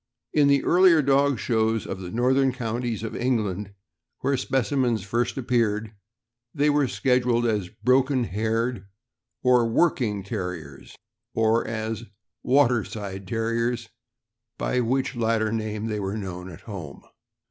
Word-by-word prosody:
In 145 Hz, -2 st, +4 dB
the 140 Hz, -1 st, +3 dB
earlier 175 Hz, -3 st, +5 dB
dog 140 Hz, 0 st, +3 dB
shows 110 Hz, -1 st, 0 dB
of -, -, -5 dB
the 90 Hz, -2 st, -6 dB
northern 130 Hz, +5 st, +2 dB
counties 120 Hz, -2 st, -3 dB
of 115 Hz, -, -4 dB
England, 105 Hz, -5 st, -1 dB, 0.5 s
where 140 Hz, -, +1 dB
specimens 130 Hz, -3 st, 0 dB
first 115 Hz, +6 st, -1 dB
ap 130 Hz, -, -5 dB
peared, 110 Hz, -3 st, +1 dB, 0.6 s
they 150 Hz, 0 st, +3 dB
were 145 Hz, -2 st, +2 dB
scheduled 125 Hz, -2 st, +1 dB
as 105 Hz, -6 st, 0 dB
" -, -, -35 dB
Broken 130 Hz, 0 st, +3 dB
haired 110 Hz, +1 st, -1 dB, 0.6 s
or 125 Hz, -2 st, +4 dB
Work 160 Hz, +5 st, +2 dB
ing 105 Hz, -4 st, -1 dB
Terriers," 90 Hz, -, -6 dB, 0.4 s
or 115 Hz, +1 st, +2 dB
as 110 Hz, 0 st, -3 dB, 0.4 s
"Waterside 110 Hz, -7 st, +1 dB
Terriers," 115 Hz, +1 st, -1 dB, 0.7 s
by 125 Hz, -, 0 dB
which 130 Hz, +3 st, 0 dB
latter 110 Hz, -2 st, +1 dB
name 110 Hz, -1 st, -3 dB
they 105 Hz, -2 st, -2 dB
were 100 Hz, +1 st, -3 dB
known 95 Hz, -2 st, -6 dB
at 85 Hz, -, -11 dB
home. 90 Hz, -10 st, -8 dB
115 Hz, 135 wpm, -25 LUFS, 105-125 Hz, 0.7 s, earlier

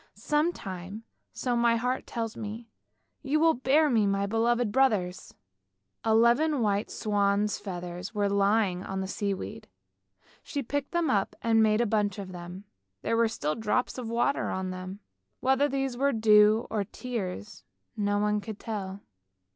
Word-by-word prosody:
Some 300 Hz, +3 st, +1 dB
time, 195 Hz, -, -7 dB, 0.3 s
so 245 Hz, -2 st, -2 dB
my 235 Hz, 0 st, +3 dB
heart 250 Hz, +3 st, -1 dB
tells 225 Hz, -2 st, -4 dB
me, 220 Hz, +2 st, -6 dB, 0.5 s
you 295 Hz, +2 st, +1 dB
will 325 Hz, 0 st, +5 dB
bear 275 Hz, +5 st, +3 dB
me 225 Hz, -6 st, +3 dB
to 200 Hz, -, +2 dB
my 195 Hz, 0 st, 0 dB
beloved 230 Hz, +2 st, +1 dB
brothers! 205 Hz, -8 st, +1 dB, 0.3 s
" -, -, -54 dB, 0.3 s
Eleven 235 Hz, +6 st, +3 dB
white 205 Hz, 0 st, 0 dB
swans' 205 Hz, -1 st, 0 dB
feathers 180 Hz, -2 st, -6 dB
were 205 Hz, -3 st, 0 dB
lying 200 Hz, -2 st, +2 dB
on 195 Hz, 0 st, -4 dB
the 190 Hz, -, -3 dB
sea 200 Hz, 0 st, -2 dB
weed; 100 Hz, -, -8 dB, 0.7 s
she 285 Hz, -, -4 dB
picked 285 Hz, +3 st, -3 dB
them 340 Hz, -5 st, +1 dB
up 200 Hz, -4 st, 0 dB
and 225 Hz, -1 st, +4 dB
made 215 Hz, +1 st, +3 dB
a -, -, +2 dB
bunch 210 Hz, -1 st, 0 dB
of 195 Hz, -2 st, -6 dB
them. 180 Hz, +2 st, -8 dB, 0.4 s
There -, -, +1 dB
were 230 Hz, 0 st, +4 dB
still 155 Hz, -9 st, -2 dB
drops 225 Hz, +5 st, -1 dB
of 235 Hz, -3 st, -5 dB
water 235 Hz, +4 st, 0 dB
on 190 Hz, 0 st, -3 dB
them. 185 Hz, +2 st, -7 dB, 0.4 s
Whether 265 Hz, +2 st, +2 dB
these 270 Hz, -2 st, -1 dB
were 275 Hz, +2 st, +1 dB
dew 215 Hz, 0 st, +5 dB
or 210 Hz, -2 st, 0 dB
tears 210 Hz, -2 st, -6 dB, 0.3 s
no 205 Hz, -1 st, 0 dB
one 210 Hz, 0 st, +1 dB
could 215 Hz, 0 st, -7 dB
tell. 200 Hz, -3 st, -5 dB
215 Hz, 165 wpm, -28 LUFS, 200-240 Hz, 0.7 s, will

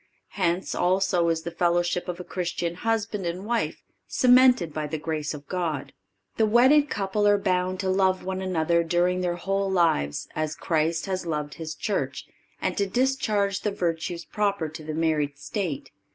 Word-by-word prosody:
Hence, 180 Hz, -1 st, -1 dB
also, 180 Hz, -1 st, +2 dB
is 165 Hz, -1 st, 0 dB
the 170 Hz, -, -4 dB
fellowship 175 Hz, +1 st, +1 dB
of 175 Hz, 0 st, -4 dB
a -, -, -5 dB
Christian 175 Hz, -1 st, -3 dB
husband 220 Hz, +1 st, -1 dB
and 180 Hz, +3 st, -4 dB
wife 235 Hz, +1 st, -1 dB, 0.2 s
cemented 250 Hz, -, +5 dB
by 150 Hz, 0 st, -2 dB
the 155 Hz, +2 st, -3 dB
grace 155 Hz, -1 st, -3 dB
of 145 Hz, -1 st, -11 dB
God. 165 Hz, -7 st, -3 dB, 0.4 s
The 220 Hz, -, +3 dB
wedded 265 Hz, +7 st, +5 dB
couple 205 Hz, +1 st, 0 dB
are 205 Hz, 0 st, +5 dB
bound 185 Hz, -2 st, 0 dB
to 190 Hz, -, -2 dB
love 190 Hz, -1 st, +2 dB
one 190 Hz, 0 st, -3 dB
another 170 Hz, -2 st, +1 dB
during 175 Hz, +2 st, +1 dB
their 175 Hz, -1 st, 0 dB
whole 195 Hz, +2 st, -1 dB
lives, 165 Hz, -, +1 dB
as 155 Hz, 0 st, -2 dB
Christ 160 Hz, 0 st, 0 dB
has 185 Hz, -2 st, -3 dB
loved 150 Hz, -2 st, -2 dB
His 160 Hz, -1 st, -6 dB
Church, 205 Hz, -, -2 dB, 0.3 s
and -, -, -1 dB
to 200 Hz, -, +2 dB
discharge 210 Hz, -4 st, +1 dB
the 210 Hz, -, -1 dB
virtues 170 Hz, -3 st, -2 dB
proper 200 Hz, -6 st, -1 dB
to 155 Hz, +1 st, -9 dB
the 155 Hz, 0 st, -5 dB
married 155 Hz, -3 st, 0 dB
state. 175 Hz, -3 st, -4 dB
180 Hz, 170 wpm, -26 LUFS, 165-200 Hz, 0.4 s, cemented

